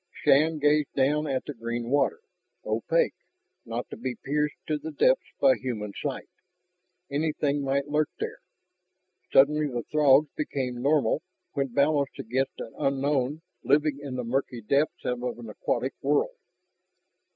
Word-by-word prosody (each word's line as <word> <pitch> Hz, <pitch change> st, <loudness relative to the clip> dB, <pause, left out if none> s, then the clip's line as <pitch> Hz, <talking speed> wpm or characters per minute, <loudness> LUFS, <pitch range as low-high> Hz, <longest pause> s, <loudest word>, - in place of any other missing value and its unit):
Shann 155 Hz, +3 st, +4 dB
gazed 150 Hz, 0 st, +2 dB
down 150 Hz, +3 st, +2 dB
at 135 Hz, -2 st, -1 dB
the 145 Hz, -, -5 dB
green 115 Hz, 0 st, -4 dB
water, 145 Hz, -, +2 dB, 0.4 s
opaque, -, -, +1 dB, 0.5 s
not 115 Hz, +1 st, -4 dB
to -, -, -5 dB
be 125 Hz, +2 st, -3 dB
pierced 150 Hz, +4 st, -1 dB
to 150 Hz, -1 st, -1 dB
the 160 Hz, -, -6 dB
depths -, -, +2 dB
by 270 Hz, -, +6 dB
human 110 Hz, -, -4 dB
sight. 140 Hz, -3 st, -4 dB, 0.8 s
Anything 145 Hz, -1 st, 0 dB
might 135 Hz, +1 st, 0 dB
lurk 150 Hz, +1 st, +1 dB
there. -, -, -4 dB, 0.9 s
Suddenly 150 Hz, +2 st, +5 dB
the 120 Hz, -4 st, -3 dB
Throgs 150 Hz, -1 st, +5 dB
became 130 Hz, -5 st, -3 dB
normal 140 Hz, -1 st, +2 dB, 0.3 s
when 140 Hz, -2 st, 0 dB
balanced 140 Hz, +2 st, +1 dB
against 130 Hz, +4 st, -2 dB
an -, -, -7 dB
unknown 140 Hz, +2 st, 0 dB, 0.2 s
living 145 Hz, -1 st, +2 dB
in 140 Hz, -3 st, -5 dB
the 125 Hz, -, -2 dB
murky 125 Hz, 0 st, -2 dB
depths 140 Hz, +7 st, +1 dB
of 125 Hz, -1 st, -1 dB
an 120 Hz, -2 st, -4 dB
aquatic 125 Hz, +4 st, -2 dB
world. 150 Hz, -, +1 dB
140 Hz, 140 wpm, -27 LUFS, 125-150 Hz, 0.9 s, by